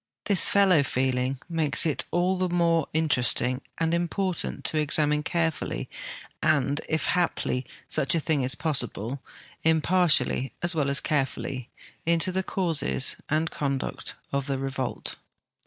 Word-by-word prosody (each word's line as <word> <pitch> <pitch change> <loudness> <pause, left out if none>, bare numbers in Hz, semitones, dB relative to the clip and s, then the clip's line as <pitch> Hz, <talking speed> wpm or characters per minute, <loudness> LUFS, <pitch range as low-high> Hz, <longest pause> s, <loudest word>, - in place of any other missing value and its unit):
This 200 -3 +5
fellow 190 -6 +4
feeling 130 0 -1
makes 160 -4 +3
it 155 - +1
all 180 +2 +1
the 185 0 -1
more 170 -3 +1
interesting 130 -4 +2 0.2
and 165 0 0
important 175 +1 -2
to 155 - +2
examine 150 0 +1
carefull}'^ 165 0 -2 0.5
and, 145 -1 +1
if 160 -2 0
haph' 170 -7 0 0.2
such 170 +5 +2
a - - +2
thing 155 -2 0
is 130 0 +3
possible, 130 -4 -2 0.4
imjjartially 160 -5 +3
as 175 +1 +3
Avell 150 -4 0
as 140 - +2
carefully, 135 -3 -2 0.3
into 170 +2 +3
the 190 +1 0
causes 165 -8 +1
and 155 +2 0
conduct 140 -2 -3 0.2
of 140 0 -1
the 135 -1 -1
revolt. 135 -1 -3
155 Hz, 135 wpm, -26 LUFS, 135-170 Hz, 0.5 s, This